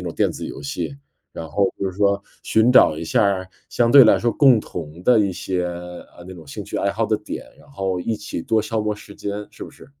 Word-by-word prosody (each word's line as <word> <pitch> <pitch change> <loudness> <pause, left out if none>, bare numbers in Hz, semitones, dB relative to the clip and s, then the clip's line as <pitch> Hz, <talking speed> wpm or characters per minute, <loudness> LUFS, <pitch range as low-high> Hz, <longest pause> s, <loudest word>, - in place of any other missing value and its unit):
种 90 -1 -5
电 - - +1
子 - - -6
游 - - -8
戏， 85 - -4 0.4
然 80 - -6
后 100 -1 +2
就 95 - -2
是 - - -14
说 100 -1 +2 0.2
寻 110 +3 +3
找 80 - +6
一 80 - -5
下 - - +2
儿 95 -2 0 0.2
相 120 -1 +1
对 140 -2 +10
来 110 - +5
说 120 -1 0
共 135 -6 +5
同 85 -4 -8
的 120 +2 +5
一 100 -2 +1
些， 90 0 -3
呃， 90 0 -9
那 95 - -9
种 85 -4 -12
兴 70 - -7
趣 - - -4
爱 100 - +1
好 110 +3 -1
的 110 0 +1
点， 105 - -7
然 - - -20
后 95 -8 -2
一 110 +4 -2
起 105 -4 -6
多 110 +5 +1
消 110 0 -2
磨 105 0 -1
时 105 -1 -13
间， 105 +1 -5
是 - - -12
不 - - -8
是？ - - -16
100 Hz, 270 characters per minute, -21 LUFS, 90-110 Hz, 0.4 s, 对